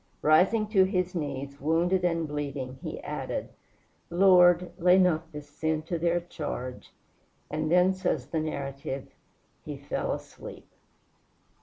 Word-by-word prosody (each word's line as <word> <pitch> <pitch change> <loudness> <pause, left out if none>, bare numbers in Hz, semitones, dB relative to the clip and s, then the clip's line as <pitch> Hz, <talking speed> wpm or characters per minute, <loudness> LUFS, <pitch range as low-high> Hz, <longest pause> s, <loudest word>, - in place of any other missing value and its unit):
Rising 185 +8 +4
to 195 -3 +5
his 185 -2 0
knees, 140 -4 -5
wounded 170 +5 +2
and 165 -2 0
bleeding, 140 -3 -5
he - - -5
added, - - -4 0.6
"Lord, 175 -1 +5
lay 180 +1 +5
not 170 -3 +2
this 150 -1 -8
sin 155 +1 -2
to 170 +1 -3
their 170 +1 +2
charge." 145 -7 -6 0.6
And 155 +1 -1
then, 180 +2 +5
says 180 -8 -1
the 160 - -2
narrative, 140 -3 -4 0.5
"He - - -6
fell - - -3
asleep." - - -8
165 Hz, 130 wpm, -28 LUFS, 145-180 Hz, 0.6 s, to